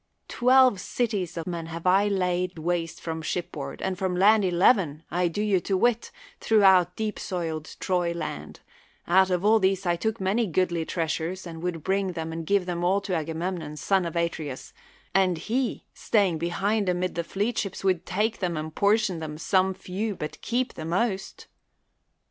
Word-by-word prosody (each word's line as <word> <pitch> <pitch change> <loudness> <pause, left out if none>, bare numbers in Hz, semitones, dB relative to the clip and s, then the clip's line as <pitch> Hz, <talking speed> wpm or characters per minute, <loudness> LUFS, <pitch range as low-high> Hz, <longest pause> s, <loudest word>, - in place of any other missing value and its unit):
Twelve 255 -3 +4
cities 195 -7 -2
of 165 - -3
men 170 -2 -4
have 165 +1 -7
I 195 +3 +4
laid 180 -2 0
w^aste 165 0 -2
from 160 -1 -4
shipboard, 155 -4 -4
and 190 0 -2
from 190 -2 -1
land 205 +3 +5
eleven, 175 - +3
I 175 +2 +1
do 190 +5 -2
you 200 -3 +2
to 190 +2 -1
wit, 235 +3 +1 0.3
throughout 190 -5 +4
deep 215 -1 -3
soiled 165 -4 -4
Troy 180 -2 0
land; 155 - -6 0.5
out 190 +2 +5
of 180 +1 0
all 220 +1 +5
these 190 -1 +1
took 220 +2 -1
I - - -4
many 210 +4 +1
goodly 175 -1 0
treasures, 165 +3 -2
and 165 -2 -8
would 170 -3 -3
bring 190 -2 -1
and 160 0 -4
give 200 -2 +2
them 175 -1 -3
all 190 +3 +3
to 195 -2 -4
Agamemnon, 165 -1 -3
son 185 +3 +1
of 165 - -7
Atreus, 160 -5 -3 0.4
and 185 -2 +3
he 235 +9 -2
staying 195 -7 +1
behind 195 +4 0
amid 180 0 -1
the 170 - -2
fleet 205 +7 -1
ships 195 -2 -4
would 185 -3 +1
take 210 +5 -1
them 175 -4 -1
and 155 0 -5
portion 200 -3 +2
out 155 -1 -6
some 190 +2 +2
few 195 +3 -4
but 150 -3 -6
keep 250 +2 -1
the - - -7
most. 190 +3 -2
180 Hz, 175 wpm, -26 LUFS, 170-200 Hz, 0.5 s, land